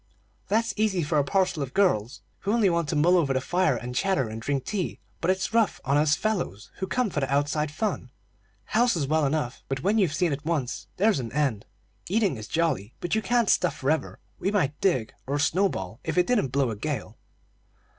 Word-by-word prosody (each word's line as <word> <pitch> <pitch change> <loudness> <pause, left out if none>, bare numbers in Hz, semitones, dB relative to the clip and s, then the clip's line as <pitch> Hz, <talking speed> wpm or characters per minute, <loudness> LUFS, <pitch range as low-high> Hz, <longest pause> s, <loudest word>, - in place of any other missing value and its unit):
"That's 225 +2 +1
easy 205 -5 +1
for 150 0 +1
a - - +3
parcel 185 +1 +1
of 135 -2 -5
girls, 140 - +1 0.2
who 200 - -2
only 215 -6 +3
want 170 -3 0
to 155 - -1
mull 170 +5 +4
over 145 -6 +2
the 130 - +1
fire, 180 +7 +1
and 125 +1 -6
chatter, 140 - +1
and 110 +1 -6
drink 140 +1 -1
tea; 195 -4 -2 0.2
but 175 - -1
it's 190 +3 0
rough 230 -3 +2
on 140 +1 +2
us 150 +1 +4
fellows, 175 - -2
who 190 - -3
come 225 +3 0
for 150 - -1
the 135 -1 -2
outside 145 +2 +1
fun. 175 - -3 0.6
House 235 +1 +2
is 155 -4 0
well 155 +1 +2
enough; 135 -4 -2
but 135 +1 -3
when 210 +3 +3
you've 170 -7 +2
seen 175 -3 +1
it 140 +1 -5
once, 150 -6 -2
there's 210 -4 +3
an 115 -3 -5
end. 135 -8 0 0.4
Eating 205 -5 +2
is 110 -2 -8
jolly, 155 - -1
but 175 - -3
you 220 - +2
can't 240 0 +2
stuff 180 - +2
forever. 150 +4 -1 0.2
We 195 - 0
might 165 -9 0
dig, 130 - +1
or 140 +2 0
snowball, 145 - 0
if - - -3
it 180 - +5
didn't 225 - +2
blow 130 -1 0
a - - -4
gale. 115 -2 -4
155 Hz, 215 wpm, -26 LUFS, 135-195 Hz, 0.6 s, it